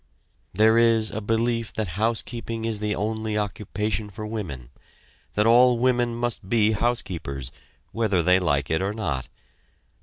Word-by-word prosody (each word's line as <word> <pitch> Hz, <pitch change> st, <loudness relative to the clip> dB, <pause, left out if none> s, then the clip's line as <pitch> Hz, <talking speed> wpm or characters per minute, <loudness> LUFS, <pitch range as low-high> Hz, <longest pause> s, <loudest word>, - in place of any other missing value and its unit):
There 110 Hz, +4 st, +4 dB
is 115 Hz, -2 st, +3 dB
a 110 Hz, -, -4 dB
belief 115 Hz, +1 st, 0 dB
that 110 Hz, -4 st, -2 dB
housekeeping 115 Hz, +3 st, -2 dB
is 110 Hz, -2 st, -1 dB
the 105 Hz, 0 st, -1 dB
only 110 Hz, 0 st, -2 dB
occupation 105 Hz, 0 st, -2 dB
for 105 Hz, +2 st, -7 dB
women; 80 Hz, -, -6 dB, 0.6 s
that 105 Hz, -, +2 dB
all 120 Hz, +1 st, +6 dB
women 120 Hz, -1 st, +1 dB
must 120 Hz, -5 st, -3 dB
be 110 Hz, -1 st, +3 dB
housekeepers, 90 Hz, -, -2 dB, 0.4 s
whether 105 Hz, -6 st, +1 dB
they 90 Hz, +2 st, +5 dB
like 70 Hz, -6 st, 0 dB
it 80 Hz, -, +1 dB
or 100 Hz, +2 st, -1 dB
not. 75 Hz, -, -3 dB
110 Hz, 145 wpm, -24 LUFS, 95-115 Hz, 0.6 s, all